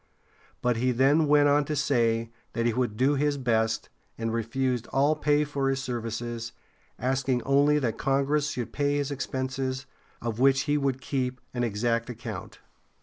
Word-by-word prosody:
But 125 -2 +2
he 125 +2 +2
then 140 +5 +3
went 145 0 +5
on 145 +1 +4
to 150 - -2
say 115 -5 +1 0.2
that 115 - -1
he 120 - +2
would 120 -3 -1
do 135 +4 +3
his 145 0 +1
best, 115 -3 0 0.3
and 115 0 -2
refused 120 +1 -1
all 145 +3 +2
pay 150 0 +2
for 140 -2 -1
his 135 0 0
services, 120 -2 -4 0.4
asking 130 0 0
only 145 +2 +4
that 120 -6 -1
Congress 140 +2 +1
should 125 -5 -4
pay 145 0 +1
his 145 0 -1
expenses, 130 -1 -3 0.3
of 115 -1 -4
which 135 +1 +5
he 145 +1 0
would 135 -2 0
keep 130 -3 -2
an 120 -1 -1
exact 115 +2 0
account. 115 -2 -7
130 Hz, 165 wpm, -27 LUFS, 120-140 Hz, 0.4 s, went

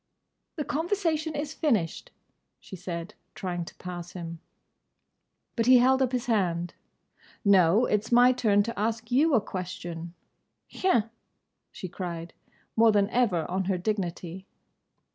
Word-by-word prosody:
"The 300 - -3
conversation 320 -2 -1
is 295 0 -3
finished," 235 - 0 0.5
she - - -10
said, 180 +1 -6 0.2
trying 175 -3 -3
to - - -12
pass 175 -1 -7
him. 170 -2 -7 1.2
But 230 -1 0
he 255 0 +8
held 260 +2 +4
up 255 -2 +2
his 250 -2 -1
hand. 175 -7 0 0.7
"No. 195 +3 +5
It's 210 +1 -1
my 245 +1 +7
turn 215 -5 +3
to 230 -1 -5
ask 225 +2 -2
you 285 +4 +4
a - - +6
question!" 175 -3 -6 0.5
"Hein?" 230 - +1 0.6
she 185 - -7
cried, 170 -2 -6 0.4
more 225 0 +6
than 205 0 +2
ever 205 -10 +2
on 190 +1 -2
her 190 0 0
dignity. 185 -2 -3
205 Hz, 135 wpm, -27 LUFS, 175-250 Hz, 1.2 s, he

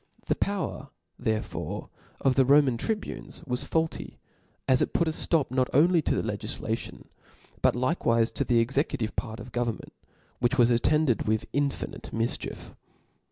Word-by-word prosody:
The - - +2
power 190 -8 -2 0.3
therefore 110 -3 -3 0.3
of 135 - +3
the 135 - +4
Roman 140 -1 +5
tribunes 210 - -4
was 125 -3 0
faulty, 160 0 -2 0.5
as 130 -1 +5
it - - 0
put 170 - +2
a - - +1
ftop 155 -4 +1
not 130 -1 +1
only 170 +4 +5
to - - 0
the - - -2
legiflation, - - -4 0.6
but - - +3
likewife 120 -4 +1
the 120 - +3
executive 125 -1 0
part 110 -2 -4
of 125 - -9
go* 120 +1 0
vernment; 115 -2 -5 0.5
which 120 +3 +1
was 120 -1 +5
attended 135 +1 +2
with 110 0 +1
infinite 140 0 -2
mif* 115 +1 0
chiefs. - - -8
130 Hz, 155 wpm, -27 LUFS, 120-150 Hz, 0.6 s, Roman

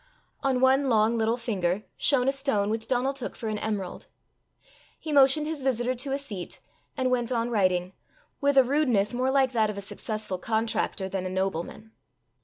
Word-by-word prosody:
On 260 -2 +1
one 265 +1 +4
long 220 0 +3
little 225 +1 +1
finger 205 -5 -1
shone 265 -3 +2
a - - +5
stone 270 -7 0
which 225 0 -3
Donal 260 +2 +1
took 270 -3 -5
for 225 - -4
an 215 -1 -2
emerald. 205 -4 -4 0.9
He 315 - -6
motioned 280 +1 +5
his 310 -2 -3
visitor 255 -1 0
to 260 +2 -4
a 275 - +1
seat, 210 -11 -5 0.4
and 255 -1 +1
went 245 -1 0
on 235 0 0
writing, 185 -4 +1 0.5
with 280 0 +2
a 265 - +9
rudeness 250 -6 +1
more 255 +2 0
like 265 -1 +3
that 220 -3 +2
of 210 - -5
a - - -4
successful 210 -1 -4
contractor 220 -2 -1
than 190 -1 -3
a - - -4
nobleman. 190 +3 -3
235 Hz, 185 wpm, -27 LUFS, 210-265 Hz, 0.9 s, a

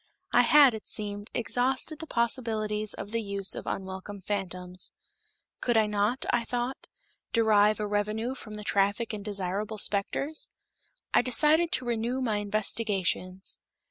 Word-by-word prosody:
I 245 - +7
had, 275 +1 +7
it 220 - -7
seemed, 205 -1 -4
exhausted 260 +6 0
the 320 - -7
possibilities 220 -4 0
of 200 - -7
the 230 0 0
use 200 -2 -1
of - - -6
unwelcome 190 +1 -5
phantoms. 185 -2 -1 0.7
Could 240 -2 +1
I 220 - +5
not, 210 +4 0
I 240 - +2
thought, 245 +2 -3 0.5
derive 215 -2 +4
a 210 - -1
revenue 210 +4 -1
from 215 -5 -9
the 210 - -7
traffic 200 +3 +1
in 210 - -4
desirable 200 +1 -3
specters? 210 +10 0 0.6
I - - +6
decided 305 +7 +4
to 255 - +2
renew 240 +2 -1
my 225 -5 0
investigations. 200 -3 -1
215 Hz, 140 wpm, -28 LUFS, 205-240 Hz, 0.7 s, I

